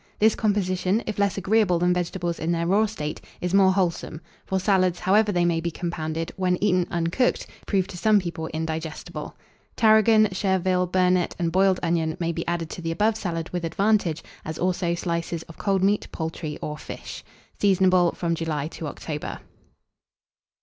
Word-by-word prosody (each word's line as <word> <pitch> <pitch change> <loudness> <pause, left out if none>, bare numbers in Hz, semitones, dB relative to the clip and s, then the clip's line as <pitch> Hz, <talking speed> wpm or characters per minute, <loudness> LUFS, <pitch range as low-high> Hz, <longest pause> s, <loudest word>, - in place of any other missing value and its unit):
This 220 +1 +4
composition, 200 0 0
if 215 -2 -4
less 200 -2 +1
agreeable 195 -1 +2
than 175 +1 +2
vegetables 175 -1 -2
in 160 +2 -1
their 170 0 0
raw 205 +5 +3
state, 150 -8 -5 0.2
is 180 +1 -3
more 195 -1 +6
wholesome; 175 -4 -1 0.3
for 190 - 0
salads, 185 -2 +2
however 205 +4 +3
they 175 -2 +2
may 165 -1 +1
be 170 - -1
compounded, 165 -1 -4
when 180 -1 +1
eaten 185 -3 +2
uncooked, 170 +9 0 0.2
prove 190 -3 +1
to 175 - -8
some 215 +1 +4
people 170 -3 -4
indigestible. 160 0 -5 0.4
Tarragon, 220 0 +5
chervil, 185 -1 +1
burnet, 180 0 +2
and 170 -1 -1
boiled 190 +1 +3
onion, 165 -2 0
may 170 -1 0
be 165 0 -4
added 170 -1 -2
to - - -6
the 165 - -3
above 210 +6 +2
salad 170 -6 -4
with 175 -1 -3
advantage, 175 -1 +1 0.2
as 160 0 -5
also 175 -1 0
slices 170 -1 -3
of 165 - -15
cold 195 -2 +1
meat, 205 +2 +2
poultry, 160 -2 -4
or 150 0 -4
fish. - - -8 0.4
Seasonable 185 -3 +4
from 170 -1 -1
July 155 -3 -2
to 165 - -6
October. 150 0 -5
180 Hz, 170 wpm, -24 LUFS, 165-195 Hz, 0.4 s, more